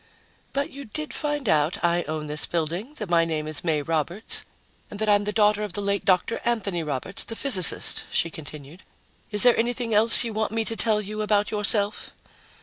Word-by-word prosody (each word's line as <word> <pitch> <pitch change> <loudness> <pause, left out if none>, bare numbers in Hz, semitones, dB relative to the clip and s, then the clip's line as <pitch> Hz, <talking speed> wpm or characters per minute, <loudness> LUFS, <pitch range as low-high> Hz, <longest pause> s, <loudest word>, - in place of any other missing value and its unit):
"But 280 +3 -2
you 280 0 -8
did 305 +7 -5
find 295 -4 -3
out 155 +1 +1
I 170 0 +2
own 155 -1 -4
this 150 0 -3
building, 175 - -3
that 210 -8 -5
my 170 -1 +3
name 155 -2 -3
is 155 -1 -4
May 155 -4 0
Roberts, 165 +7 -2 0.5
and 205 - -8
that 220 - -1
I'm 205 -1 +3
the 210 - -1
daughter 210 -1 +2
of 210 -4 -4
the 205 - 0
late 200 0 -1
Dr. 185 +4 +1
Anthony 205 -7 -1
Roberts, 150 +4 -3
the 225 - -5
physicist," 220 -10 +4
she 165 - 0
continued. 150 +2 -10 0.5
"Is 210 -1 +2
there 245 -1 +6
anything 235 0 -1
else 225 +3 +5
you 230 -2 -4
want 220 0 -2
me 225 0 -1
to 225 - -2
tell 220 -2 +1
you 215 +1 -5
about 210 -1 +1
yourself?" 210 0 +1
205 Hz, 200 wpm, -24 LUFS, 165-225 Hz, 0.5 s, there